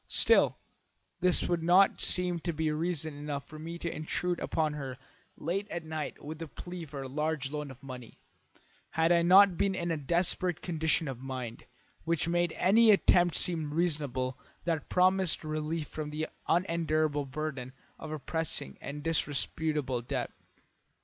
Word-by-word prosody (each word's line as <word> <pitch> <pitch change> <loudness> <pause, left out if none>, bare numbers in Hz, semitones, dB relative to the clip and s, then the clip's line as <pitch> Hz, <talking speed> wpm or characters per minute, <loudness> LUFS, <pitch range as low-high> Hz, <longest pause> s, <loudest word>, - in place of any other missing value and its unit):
Still, - - +4 0.6
this 180 -1 +2
would 175 -1 0
not 180 +4 +4
seem 180 -1 +3
to 170 +1 -2
be 155 -1 -1
reason 160 -1 -1
enough 145 -1 -5
for 155 - -11
me 165 +2 -6
to 170 -1 -4
intrude 175 +3 -2
upon 155 -2 0
her 135 -3 -6 0.4
late 195 +6 -2
at 170 -2 -5
night 155 -1 -5
with 155 +2 -7
a 165 - -4
plea 175 +2 -8
for 140 -2 -7
a - - -6
large 150 0 -2
loan 150 -1 -4
of 130 +1 -13
money, 125 -3 -9 0.8
had 165 +1 +4
I 170 -1 +5
not 185 +1 +7
been 195 -1 +1
in 170 -2 -2
a 165 - 0
desperate 175 +3 0
condition 160 -2 +1
of 130 -3 -5
mind, 130 -3 -6 0.4
which 165 -1 0
made 175 0 +1
any 220 +5 +5
attempt 175 -4 +5
seem 160 -4 +2
reasonable 145 -7 -1 0.3
that 165 -3 -1
promised 185 -1 +3
relief 155 0 -3
from 155 -1 -5
the 155 +1 -3 0.2
unendurable 155 -4 +1
burden 135 -2 -4 0.3
of 155 - -7
a 155 - -3
pressing 155 - -3
and 145 +1 -6
disreputable 150 -3 0
debt. 120 - -3
160 Hz, 160 wpm, -30 LUFS, 145-175 Hz, 0.8 s, not